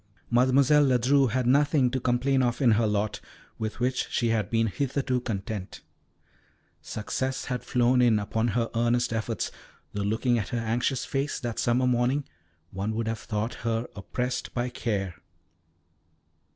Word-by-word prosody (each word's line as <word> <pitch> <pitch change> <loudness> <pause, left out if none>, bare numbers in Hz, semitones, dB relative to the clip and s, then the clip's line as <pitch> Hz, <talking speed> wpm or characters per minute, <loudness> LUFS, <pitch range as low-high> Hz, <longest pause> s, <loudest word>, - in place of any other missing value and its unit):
Mademoiselle 135 +4 +5
Ledru 130 +2 +3
had 125 +2 0
nothing 140 0 +3
to 130 - -1
complain 130 +2 +1
of 120 -2 0
in 130 -5 +4
her 110 +1 +3
lot, 105 0 -1 0.4
with 110 +1 -4
which 125 +1 0
she 120 - 0
had 110 -3 0
been 115 -1 +2
hitherto 130 +2 -1
content. 100 -3 -5 1.0
Success 130 +5 -3
had 125 -2 -3
flowed 125 0 +3
in 120 -3 +4
upon 110 +3 -1
her 115 +1 0
earnest 120 +1 +1
efforts, 110 -1 -2 0.4
though 100 - -2
looking 115 +4 +1
at 105 - -4
her 120 - -2
anxious 120 +3 0
face 140 +1 -2
that 120 -4 -4
summer 120 +2 +2
morning 125 +3 +2 0.5
one 100 +3 -3
would 115 0 -2
have 115 -1 -2
thought 105 +3 -3
her 115 0 -1
oppressed 125 +5 -3
by 120 0 0
care. 100 -7 -3
120 Hz, 150 wpm, -27 LUFS, 110-130 Hz, 1.0 s, Mademoiselle